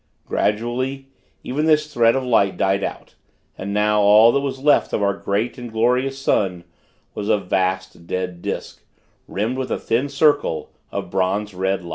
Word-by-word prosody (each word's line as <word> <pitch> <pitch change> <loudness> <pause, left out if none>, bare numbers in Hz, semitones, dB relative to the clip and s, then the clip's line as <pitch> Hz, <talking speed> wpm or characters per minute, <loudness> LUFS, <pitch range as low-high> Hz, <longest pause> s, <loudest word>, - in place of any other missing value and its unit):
Gradually, 130 +5 -1 0.3
even 145 +5 -1
this 150 -1 +2
thread 115 0 +4
of 135 - -1
light 110 -6 +2
died 95 +1 +1
out; - - -6 0.4
and 100 +1 -5
now, 105 +1 +2
all 105 +3 +7
that 140 - +1
was 140 -1 -3
left 145 +2 +2
of 105 - 0
our 100 0 +2
great 110 +6 -2
and 120 -2 -7
glorious 125 +4 +1
sun, 95 -10 0 0.5
was 105 0 -4
a - - +4
vast 95 -2 -2
dead 90 -1 -3
disk, - - -5 0.5
rimmed 115 +6 -2
with 130 -1 -3
a - - -1
thin 125 +5 -1
circle 140 - +1 0.2
of - - -5
bronze 100 +2 -1
red 95 +1 -1
light. 85 - -9
110 Hz, 170 wpm, -21 LUFS, 95-130 Hz, 0.5 s, all